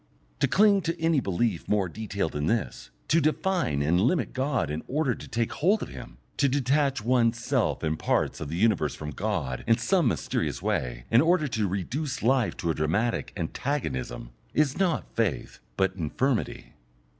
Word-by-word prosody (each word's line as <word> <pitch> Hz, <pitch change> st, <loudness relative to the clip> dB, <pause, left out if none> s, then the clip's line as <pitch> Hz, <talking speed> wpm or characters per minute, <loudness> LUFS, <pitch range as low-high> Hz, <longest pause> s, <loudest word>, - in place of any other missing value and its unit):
To -, -, +3 dB
cling 205 Hz, -1 st, +4 dB
to 165 Hz, -1 st, -3 dB
any 165 Hz, -2 st, +3 dB
belief 100 Hz, -3 st, -1 dB
more 100 Hz, -3 st, +1 dB
detailed 100 Hz, -2 st, -3 dB
than 75 Hz, +1 st, -2 dB
this, 95 Hz, -, -2 dB, 0.2 s
to 165 Hz, +1 st, +3 dB
define 155 Hz, -, +1 dB
and 85 Hz, +5 st, +2 dB
limit 130 Hz, -, +1 dB
God 130 Hz, -, 0 dB
in 75 Hz, +1 st, -3 dB
order 140 Hz, -2 st, +1 dB
to -, -, -10 dB
take 115 Hz, 0 st, -1 dB
hold 200 Hz, +8 st, +2 dB
of -, -, -7 dB
Him, -, -, -10 dB, 0.2 s
to 140 Hz, -, +3 dB
detach 140 Hz, -1 st, +1 dB
one's 120 Hz, -2 st, +3 dB
self 115 Hz, -, 0 dB
and 80 Hz, 0 st, -1 dB
parts -, -, 0 dB
of 70 Hz, -, -4 dB
the 80 Hz, -, -3 dB
universe 105 Hz, +1 st, +2 dB
from 75 Hz, -1 st, -6 dB
God 80 Hz, -, -2 dB
in 115 Hz, 0 st, +5 dB
some 180 Hz, -7 st, +2 dB
mysterious -, -, -1 dB
way -, -, -2 dB
in 115 Hz, +2 st, +6 dB
order 165 Hz, -1 st, +3 dB
to 110 Hz, -4 st, 0 dB
reduce 125 Hz, -, -3 dB
life 125 Hz, -1 st, +2 dB
to 85 Hz, -, -1 dB
a -, -, 0 dB
dramatic 85 Hz, +11 st, 0 dB
antagonism, 80 Hz, -, -3 dB, 0.2 s
is 145 Hz, -3 st, +2 dB
not 180 Hz, -5 st, 0 dB
faith, 110 Hz, -5 st, -1 dB, 0.2 s
but 95 Hz, -1 st, +2 dB
infirmity. 110 Hz, -, -2 dB
115 Hz, 175 wpm, -27 LUFS, -, 0.2 s, in